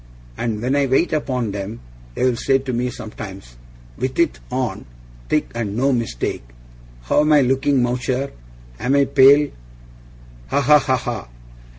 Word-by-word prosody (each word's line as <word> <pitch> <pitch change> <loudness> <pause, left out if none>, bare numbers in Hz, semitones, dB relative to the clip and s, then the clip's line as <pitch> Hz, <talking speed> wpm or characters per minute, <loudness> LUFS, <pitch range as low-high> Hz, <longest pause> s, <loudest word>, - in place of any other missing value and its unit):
And 110 - -3
when 130 +3 +1
I 140 -1 +2
wait 135 +7 +2
upon 125 -8 -1
'em, 100 +3 -5 0.4
they'll 125 -1 +1
say 135 +3 +2
to 130 -1 -5
me 125 +1 0
sometimes 95 - -9 0.4
WITH 130 0 -2
IT 170 -3 +1
ON 125 - -3 0.4
thick, - - 0
and 110 -3 -3
no 135 +2 +2
mistake 115 - -2 0.6
"How - - +2
am 150 +1 +2
I 150 - +6
looking, 135 +1 +2
Mowcher? 125 +2 -1 0.5
Am 135 +3 +1
I 140 -1 +4
pale?" 140 +2 +5 1.0
Ha! - - +1
ha! 150 +2 +6
ha! 130 -2 +1
ha! 120 - -5
130 Hz, 155 wpm, -20 LUFS, 115-140 Hz, 1.0 s, I